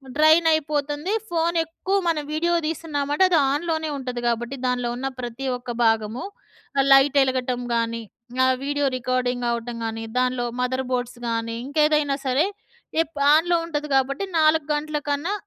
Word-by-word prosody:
Drain 315 +2 +5
అయిపోతుంది. 295 +2 -1 0.2
Phone 340 0 0
ఎక్కువ 370 +5 -2
మనం 310 -3 +1
వీడియో 340 +2 +1
తీస్తున్నామంటే 305 0 -1
అది 340 - +4 0.2
ఆన్‍లోనే 315 0 -1
ఉంటది 250 -2 -4
కాబట్టి 240 +3 -1
దానిలో 245 -1 0
ఉన్న 265 +2 -3
ప్రతి 245 +2 -5
ఒక్క 245 0 -7
భాగము 225 +2 +1 0.7
లైట్ 270 +1 +6
ఎలగటం 255 -1 -1
గాని 230 0 -1 0.4
ఆహ్, 260 0 +3
వీడియో 290 0 0
రికార్డింగ్ 250 -1 -1
అవ్వటం 235 0 -3
గాని 225 0 -4
దానిలో 250 -1 +1 0.2
మదర్‌బోర్డ్స్ 250 -1 -2
గాని 230 0 -2
ఇంకేదైనా 300 -1 +2
సరే 265 +6 +2 0.6
ఎప్ 310 -2 -19 0.2
ఆన్‍లో 340 +2 +4
ఉంటది 300 -2 -3
కాబట్టి 275 +6 +1 0.2
4 310 -1 +4
గంటల 300 0 -2
కన్నా 295 +8 -1
275 Hz, 140 wpm, -23 LUFS, 245-310 Hz, 0.7 s, లైట్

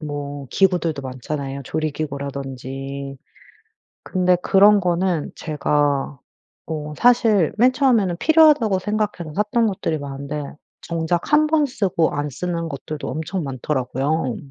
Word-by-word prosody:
뭐 145 -2 -5
기구들도 175 -6 +1
많잖아요. 135 +1 -5
조리기구라든지. 140 -2 -5 0.9
근데 180 -1 +2
그런 205 +1 +6
거는 175 -2 0
제가 145 -2 0 0.5
어 150 -2 -5
사실 225 -8 +4
맨 250 +3 +5
처음에는 230 -10 +2
필요하다고 300 - +5
생각해서 210 -6 -2
샀던 220 +3 +1
것들이 185 -6 -2
많은데 140 +1 -5 0.4
정작 170 - -2
1 305 +1 +5
번 305 -1 +2
쓰고 195 -9 0
안 145 0 -2
쓰는 170 +3 -3
것들도 150 +2 -6
엄청 160 +3 -3
많더라고요. 135 +1 -2
160 Hz, 275 characters per minute, -21 LUFS, 140-195 Hz, 0.9 s, 그런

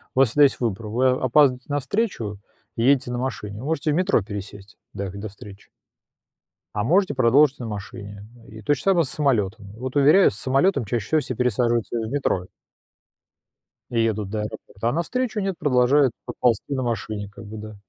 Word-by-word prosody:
у - - +1
вас 135 -3 +5
всегда 145 +6 +4
есть 140 - +3
выбор: 110 -2 -2
вы 125 +5 +1
опаздываете 130 0 +3
на 145 0 0
встречу 130 - -2 0.4
и 115 - -1
едете 130 -1 +3
на 120 - -2
машине, 115 -4 -4
можете 155 +1 -1
в - - +1
метро 185 - +2
пересесть 100 0 -9 0.2
до 100 -1 -4
до 100 +2 -7
встречи. 100 0 -14 1.1
А 105 - 0
можете 180 - +3
продолжить 135 +3 +4
на 120 - -5
машине, 105 -1 -8 0.2
и 110 +1 -11
то 145 - +3
же 140 - -4
самое 190 -4 +3
с - - -7
самолётом. 110 -9 -1
Вот 130 +3 -5
уверяю, 150 +7 +6
с - - -10
самолётом 135 - +2
чаще 115 +1 -2
всего 155 -1 +2
все 125 -2 -5
пересаживаются 120 -1 0
в 110 - -4
метро. 130 -10 0 1.5
И 115 - 0
едут 110 -3 0
до 110 +1 -3
аэропорта, 105 +1 -5
а - - -1
навстречу 220 - -1
нет, 195 -2 -2
продолжают 130 -1 +3
проползти 120 +1 0
на 130 -1 -1
машине, 110 -3 -3
как 105 - -12
бы, 110 +1 -8
да. 110 0 -8
120 Hz, 185 wpm, -23 LUFS, 105-140 Hz, 1.5 s, уверяю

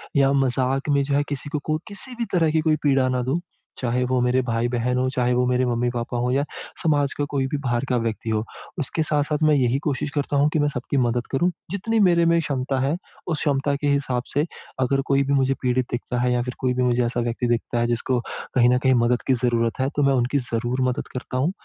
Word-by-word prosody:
या 135 -1 +4
मज़ाक, 135 +1 +1
में 140 -1 +3
जो 140 0 -1
है, 145 - +3
किसी 145 0 -3
को 150 - -2
कोई 155 0 0
किसी 230 +5 -6
भी 235 0 -2
तरह 165 -3 +3
की 160 0 +2
कोई 155 -1 +2
पीड़ा 135 -3 +3
ना 125 -1 0
दूँ। 135 +7 0 0.4
चाहे 125 0 0
वो 130 0 +1
मेरे 125 +1 +2
भाई-बहन 120 +1 0
हो, 130 0 +1
चाहे 125 -1 +1
वो 125 +1 +2
मेरे 125 0 +2
मम्मी-पापा 120 0 -1
हो 125 +1 0
या 140 +2 +2 0.4
समाज 145 -4 +2
का 145 - 0
कोई 135 -2 0
भी 145 - -2
बाहर 120 0 0
का 125 - +2
व्यक्ति 115 -1 -2
हो। 110 0 0 0.4
उसके 155 +3 -1
साथ-साथ 150 +1 0
मैं 155 -1 +5
यही 125 -1 +2
कोशिश 145 -1 -1
करता 145 -1 -1
हूँ, 145 +2 +4
कि 155 - +2
मैं 145 - +3
सबकी 140 -1 -3
मदद 120 -1 +1
करूँ। 175 +7 +2 0.2
जितनी 220 +3 0
मेरे 175 -4 +4
में 170 0 +4
क्षमता 135 -3 -1
है, 140 +4 +1 0.3
उस 160 -4 -1
क्षमता 140 0 +1
के 145 +1 -2
हिसाब 135 -3 0
से 145 +2 +2 0.3
अगर 135 +1 +2
कोई 140 0 +3
भी 140 - 0
मुझे 135 -1 +3
पीड़ित 125 -1 +1
दिखता 120 0 -2
है 125 0 +2
या 120 - +1
फिर 125 0 -4
कोई 125 -1 +1
भी 125 - 0
मुझे 125 0 +2
ऐसा 120 +1 -2
व्यक्ति 120 +1 -1
दिखता 120 0 0
है, 120 - +1
जिसको 120 +1 0 0.4
कहीं 120 -1 +5
न 125 - +4
कहीं 130 0 +3
मदद 120 0 +2
की 130 - +4
ज़रूरत 115 0 +1
है। 130 - +1
तो 145 - +2
मैं 140 - +4
उनकी 125 +2 +1
ज़रूर 120 0 -2
मदद 125 - -3
करता 125 0 -4
हूँ। 145 +7 +1
130 Hz, 245 wpm, -23 LUFS, 125-145 Hz, 0.4 s, मैं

